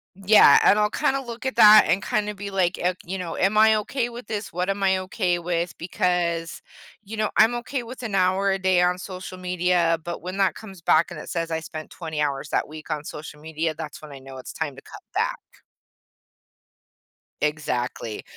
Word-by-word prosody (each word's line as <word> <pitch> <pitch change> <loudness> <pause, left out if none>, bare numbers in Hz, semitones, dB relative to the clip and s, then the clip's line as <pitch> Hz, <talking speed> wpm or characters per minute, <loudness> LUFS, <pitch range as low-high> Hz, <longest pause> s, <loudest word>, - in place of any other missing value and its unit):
Yeah, 195 -6 +7
and 205 - +5
I'll 210 0 +2
kinda 275 -2 0
look 240 -1 -8
at 260 - -3
that 215 0 +9
and 185 +4 +1
kinda 210 0 -1
be, 200 0 -6
like, 185 -2 +1
i 180 +1 +1
you 190 +2 -5
know, 175 -2 -5
"Am 200 +3 +1
I 220 0 +6
okay 240 +3 -2
with 240 -2 -10
this? 210 -4 -5
What 180 +2 -1
am 195 0 -1
I 190 -1 +3
okay 185 -2 -1
with?" 170 0 -2
Because, 170 -1 -1 0.4
you 215 +2 -8
know, 215 -1 0
I'm 225 +3 +5
okay 255 +2 -3
with 245 +1 -9
an 220 - -4
hour 195 +1 +2
a 195 - -1
day 185 -2 +3
on 180 +1 +1
social 185 0 -8
media, 180 -2 +1
but 175 0 -5
when 185 +3 -6
that 195 -1 +2
comes 195 -5 -12
back 165 +2 +3
and 170 - -8
it - - -9
says 165 -1 -2
I 160 0 -2
spent 155 -1 -8
20 160 -3 -5
hours 140 -2 -2
that - - 0
week 155 +1 -9
on 150 -1 -2
social 150 0 -9
media, 160 +1 -2
that's 155 -1 -8
when 150 - -10
I 140 - -9
know 135 0 -11
it's 130 - -9
time 150 -4 -4
to 135 - -13
cut - - -12
back. - - 0 2.0
Exactly, 125 -7 -2
180 Hz, 210 wpm, -24 LUFS, 165-205 Hz, 2.0 s, that